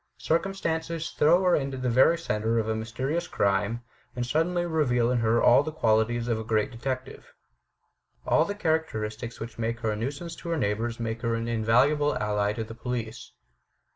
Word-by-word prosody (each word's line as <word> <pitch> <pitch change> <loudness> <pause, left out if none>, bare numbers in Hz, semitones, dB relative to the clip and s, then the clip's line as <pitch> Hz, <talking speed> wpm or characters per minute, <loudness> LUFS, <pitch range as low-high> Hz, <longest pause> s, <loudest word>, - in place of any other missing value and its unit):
Circumstances 165 -2 -1
throw 170 +5 +4
her 180 -1 +4
into 135 -2 -2
the 130 0 -2
very 130 +8 +4
centre 115 -7 -1
of 110 -1 0
a 110 - 0
mysterious 130 +10 -3
crime, 100 +4 0 0.3
and 120 0 -2
suddenly 175 +6 0
reveal 125 -8 +1
in 125 - +1
her 115 0 +2
all 120 - +7
the 155 +2 -4
qualities 115 -3 +1
of 115 -2 0
a - - -4
great 110 +3 0
detective. 130 +2 -5 0.9
All 155 - +4
the 205 +5 -4
characteristics 120 - -2
which 115 0 -8
made 115 0 -2
her 110 - 0
a - - -2
nuisance 140 +9 -4
to 170 - -7
her 165 - 0
neighbours 115 -1 -1
make 115 0 -3
her 115 -1 0
an 115 0 -3
invaluable 125 +7 +2
ally 105 -1 0
to 115 - -3
the 110 +1 -9
police. 120 -1 -5
120 Hz, 180 wpm, -27 LUFS, 110-155 Hz, 0.9 s, all